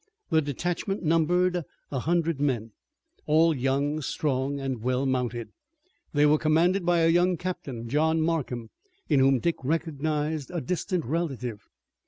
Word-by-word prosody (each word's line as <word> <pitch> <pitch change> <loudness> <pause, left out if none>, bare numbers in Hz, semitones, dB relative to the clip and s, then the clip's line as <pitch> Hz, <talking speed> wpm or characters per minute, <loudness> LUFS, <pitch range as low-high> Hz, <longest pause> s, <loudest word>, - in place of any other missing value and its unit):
The 160 -1 +4
detachment 175 - -3
numbered 175 +3 +2 0.3
a 135 - -1
hundred 165 +1 0
men, 120 -6 0 0.6
all 160 +1 +4
young, 140 +3 0
strong, 140 -1 -1
and 135 -4 -3
well 130 +3 0
mounted. 125 -3 -1 0.6
They 145 0 +3
were 150 +1 +4
commanded 170 +5 +3
by 175 -1 +4
a 165 - +4
young 175 +2 +3
captain, 140 -10 -5
John 160 +5 +2
Markham, 145 -8 -1 0.4
in 145 -4 +4
whom 135 0 +5
Dick 170 +7 0
recognized 155 0 -1
a 175 - -3
distant 180 +3 -2
relative. 125 -7 -3
155 Hz, 140 wpm, -27 LUFS, 135-165 Hz, 0.6 s, whom